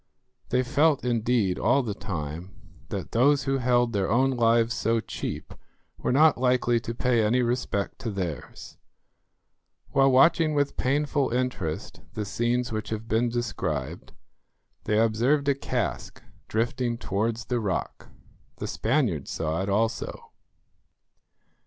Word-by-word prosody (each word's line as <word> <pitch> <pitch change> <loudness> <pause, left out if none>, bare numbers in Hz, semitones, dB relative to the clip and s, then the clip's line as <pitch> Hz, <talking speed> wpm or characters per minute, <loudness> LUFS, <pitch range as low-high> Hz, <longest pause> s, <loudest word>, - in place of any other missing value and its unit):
They 125 +1 +2
felt, 145 +2 +2
indeed, 115 -5 +1
all 130 +5 +3
the 110 -4 -3
time, 90 -3 -6 0.3
that - - -5
those 140 +4 +3
who 135 0 0
held 120 -1 +2
their 100 -2 0
own 130 +4 +3
lives 115 -1 +3
so 115 0 +1
cheap - - -6 0.5
were - - -1
not 150 +1 +5
likely 125 -2 +2
to 115 0 -6
pay 120 -2 +2
any 120 +4 +2
respect 120 -4 -2
to 115 - -4
theirs. 90 -7 -6 1.1
While 135 0 +4
watching 155 +4 +4
with 145 -1 +1
painful 140 +1 0
interest 120 -10 -3
the 105 -2 -2
scenes 120 +4 -1
which 110 -1 -4
have 110 0 -4
been 115 +1 +1
described, 105 - -3 0.7
they 105 - +1
observed 120 +6 +2
a 140 - +5
cask 130 -4 -4 0.2
drifting 120 +2 -1
towards 115 +2 -2
the 125 -1 -1
rock. 100 -5 -3 0.5
The - - -5
Spaniards 100 - 0
saw 80 +2 -2
it 95 - -2
also. 110 +3 -2
120 Hz, 135 wpm, -26 LUFS, 105-130 Hz, 1.1 s, not